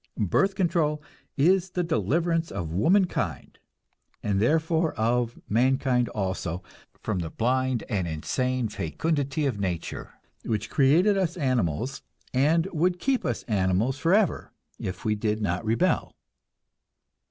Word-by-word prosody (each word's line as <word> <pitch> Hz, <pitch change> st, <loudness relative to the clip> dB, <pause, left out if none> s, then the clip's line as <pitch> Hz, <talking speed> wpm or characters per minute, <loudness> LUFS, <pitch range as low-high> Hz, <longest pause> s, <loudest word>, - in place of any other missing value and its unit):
Birth 190 Hz, -, +2 dB
control 165 Hz, -5 st, +1 dB, 0.4 s
is 185 Hz, +6 st, +3 dB
the 180 Hz, 0 st, -1 dB
deliverance 165 Hz, -, 0 dB
of 85 Hz, -6 st, -4 dB
womankind, 105 Hz, -, +1 dB, 0.6 s
and 100 Hz, -2 st, +1 dB
therefore 160 Hz, +5 st, +2 dB
of 120 Hz, +1 st, 0 dB
mankind 125 Hz, +1 st, +2 dB
also, 95 Hz, -3 st, -3 dB, 0.4 s
from 105 Hz, -4 st, -1 dB
the 85 Hz, -2 st, -3 dB
blind 130 Hz, +3 st, 0 dB
and 95 Hz, -4 st, -1 dB
insane 125 Hz, -, -1 dB
fecundity 140 Hz, -, -1 dB
of 125 Hz, -7 st, -1 dB
nature, 90 Hz, -4 st, -4 dB, 0.3 s
which 110 Hz, -1 st, -2 dB
created 170 Hz, +9 st, +4 dB
us 180 Hz, -2 st, -1 dB
animals, 130 Hz, -, -1 dB, 0.3 s
and 155 Hz, +6 st, +3 dB
would 175 Hz, +3 st, +1 dB
keep 260 Hz, +6 st, 0 dB
us 120 Hz, -, -2 dB
animals 105 Hz, +6 st, 0 dB
forever 190 Hz, +3 st, +2 dB, 0.3 s
if 95 Hz, 0 st, -5 dB
we 110 Hz, -, +2 dB
did 105 Hz, 0 st, -1 dB
not 95 Hz, -1 st, -1 dB
rebel. 115 Hz, +11 st, +1 dB
130 Hz, 120 wpm, -26 LUFS, 105-165 Hz, 0.6 s, created